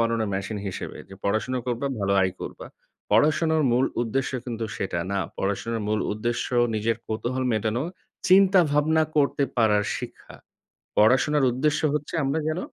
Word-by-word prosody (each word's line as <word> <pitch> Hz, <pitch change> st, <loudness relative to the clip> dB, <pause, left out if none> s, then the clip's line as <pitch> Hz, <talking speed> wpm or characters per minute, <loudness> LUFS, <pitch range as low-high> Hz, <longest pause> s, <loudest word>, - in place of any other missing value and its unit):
বানানোর 115 Hz, -2 st, +1 dB
মেশিন 100 Hz, +2 st, -3 dB
হিসেবে। 95 Hz, -, -6 dB
যে 95 Hz, -, -10 dB
পড়াশোনা 110 Hz, +5 st, 0 dB
করবা 125 Hz, +2 st, -1 dB
ভালো 100 Hz, 0 st, +1 dB
আয় 95 Hz, -1 st, +1 dB
করবা। -, -, -7 dB, 0.4 s
পড়াশোনার 160 Hz, +1 st, +3 dB
মূল 125 Hz, +2 st, +3 dB, 0.2 s
উদ্দেশ্য 130 Hz, +3 st, -1 dB
কিন্তু 115 Hz, -2 st, -4 dB
সেটা 95 Hz, -3 st, -2 dB
না। 100 Hz, -, 0 dB, 0.2 s
পড়াশোনার 110 Hz, +3 st, -2 dB
মূল 110 Hz, 0 st, +1 dB
উদ্দেশ্য 120 Hz, +3 st, -2 dB, 0.3 s
নিজের 110 Hz, +2 st, 0 dB
কৌতূহল 125 Hz, +4 st, -2 dB
মেটানো, 110 Hz, +3 st, 0 dB, 0.5 s
চিন্তা 190 Hz, 0 st, +6 dB
ভাবনা 155 Hz, +2 st, +3 dB
করতে 140 Hz, -1 st, +2 dB
পারার 105 Hz, -3 st, +3 dB
শিক্ষা। -, -, -9 dB, 0.6 s
পড়াশোনার 130 Hz, +7 st, +4 dB
উদ্দেশ্য 145 Hz, +5 st, 0 dB
হচ্ছে 150 Hz, +1 st, -3 dB
আমরা 140 Hz, +4 st, 0 dB
যেন 155 Hz, +3 st, -1 dB
120 Hz, 145 wpm, -25 LUFS, 110-145 Hz, 0.6 s, চিন্তা